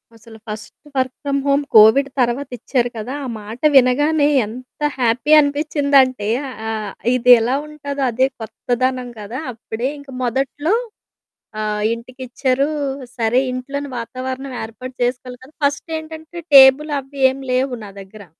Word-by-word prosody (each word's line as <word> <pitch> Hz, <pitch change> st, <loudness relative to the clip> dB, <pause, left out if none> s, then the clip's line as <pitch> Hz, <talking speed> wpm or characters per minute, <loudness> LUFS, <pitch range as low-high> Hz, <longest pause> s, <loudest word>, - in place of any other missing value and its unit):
అసల 225 Hz, 0 st, -15 dB
first 210 Hz, -1 st, -7 dB, 0.2 s
work 260 Hz, 0 st, 0 dB
from 280 Hz, -1 st, 0 dB
home 280 Hz, +1 st, +2 dB
Covid 220 Hz, +6 st, +7 dB
తర్వాతిచ్చారు 245 Hz, 0 st, -1 dB
కదా! 225 Hz, +5 st, -5 dB
ఆ -, -, -4 dB
మాట 215 Hz, +3 st, -9 dB, 0.2 s
వినగానే 290 Hz, +4 st, +4 dB, 0.2 s
ఎంత 250 Hz, +6 st, -11 dB, 0.2 s
హ్యాపీ 245 Hz, +4 st, +1 dB
అనిపిచ్చిందంటే 280 Hz, -6 st, +2 dB, 0.4 s
ఆహ్, 215 Hz, -2 st, -4 dB, 0.2 s
ఇది 250 Hz, 0 st, +4 dB
ఎలా 245 Hz, +4 st, +1 dB
ఉంటాదో 285 Hz, -2 st, -5 dB
అదే 260 Hz, +3 st, +2 dB
కొత్తదనం 250 Hz, +2 st, -2 dB
కదా! 215 Hz, +5 st, -6 dB
అప్పుడే 230 Hz, +2 st, -4 dB
ఇంక 280 Hz, -1 st, -15 dB
మొదట్లో 270 Hz, -, -1 dB, 0.9 s
ఆహ్, 210 Hz, 0 st, -2 dB
ఇంటికిచ్చారు 255 Hz, +3 st, -2 dB, 0.5 s
సరే, 235 Hz, +1 st, +2 dB
ఇంట్లోని 280 Hz, +3 st, -5 dB
వాతావరణం 255 Hz, +2 st, -5 dB
ఏర్పాటు 255 Hz, +3 st, -9 dB
చేసుకోవాలి 250 Hz, 0 st, -4 dB
కదా! 285 Hz, +4 st, -18 dB
ఫస్టేంటంటే 315 Hz, +3 st, -4 dB
టేబుల్ 270 Hz, +3 st, +8 dB
అవ్వి 275 Hz, +1 st, -11 dB
ఏమి 270 Hz, +1 st, -8 dB
లేవు 255 Hz, 0 st, 0 dB
నా 205 Hz, -, -9 dB
దగ్గర. 200 Hz, +2 st, -12 dB
255 Hz, 125 wpm, -19 LUFS, 235-280 Hz, 0.9 s, టేబుల్